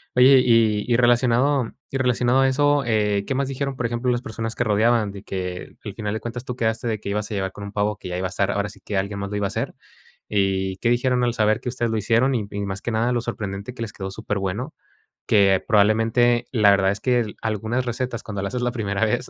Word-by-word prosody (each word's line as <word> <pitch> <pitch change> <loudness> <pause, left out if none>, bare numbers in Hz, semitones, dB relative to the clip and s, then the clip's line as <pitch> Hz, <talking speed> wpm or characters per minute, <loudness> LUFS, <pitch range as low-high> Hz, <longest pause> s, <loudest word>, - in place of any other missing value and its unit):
Oye, 130 +1 +7
y 110 -3 +3
y - - +4
relacionado 120 +1 +3 0.2
y 135 - -2
relacionado 125 0 +2
a 135 - +4
eso, 145 +1 +2
eh, 105 -3 +1
¿qué - - 0
más 140 0 0
dijeron, 135 0 -3
por 120 - -2
ejemplo, 120 +2 0
las 120 0 0
personas 115 0 -5
que - - 0
rodeaban, 110 0 +2
de 100 0 -9
que 90 -2 -5
al - - -5
final 105 -2 -3
de 110 - -2
cuentas 120 +2 -6
tú 125 - -4
quedaste 115 0 -1
de 110 -2 -2
que - - -9
ibas 105 +1 -2
a - - -2
llegar 95 -1 -2
con 100 - -9
un 100 - -7
pavo 105 0 -1
que 90 - -8
ya 90 - -3
iba 95 0 -1
a - - -8
estar, 100 +1 0
ahora 100 0 -1
sí 100 -1 -15
que 100 - -3
alguien 100 +1 -2
más 100 0 -4
lo 105 - -2
iba 100 - 0
a - - -6
hacer? - - -3 0.6
¿Y 95 -2 0
qué 120 - 0
dijeron 125 +1 +2
al 120 -1 +1
saber 110 -1 +2
que - - -3
ustedes 120 -2 -1
lo 110 - 0
hicieron?, 115 +5 +2
y 120 - +1
m 100 - -7
y 100 0 -4
más 100 0 -5
que 120 - -3
nada 115 +2 +1
lo 120 -1 0
sorprendente, 105 -1 -5
que 115 - -10
les 105 - -6
quedó 95 0 -5
superbueno. 100 - -3 0.5
Que 100 -3 +4
probablemente, 115 +3 +3
la 105 -5 +5
verdad 95 -1 +3
es 100 - -4
que, 120 -4 +1
algunas 110 +3 -1
recetas, 120 0 -3
cuando 100 -2 -5
la 100 - -2
haces 125 +3 -3
la 125 - +1
primera 105 -2 0
vez, 105 - -1
110 Hz, 260 wpm, -23 LUFS, 100-120 Hz, 0.6 s, Oye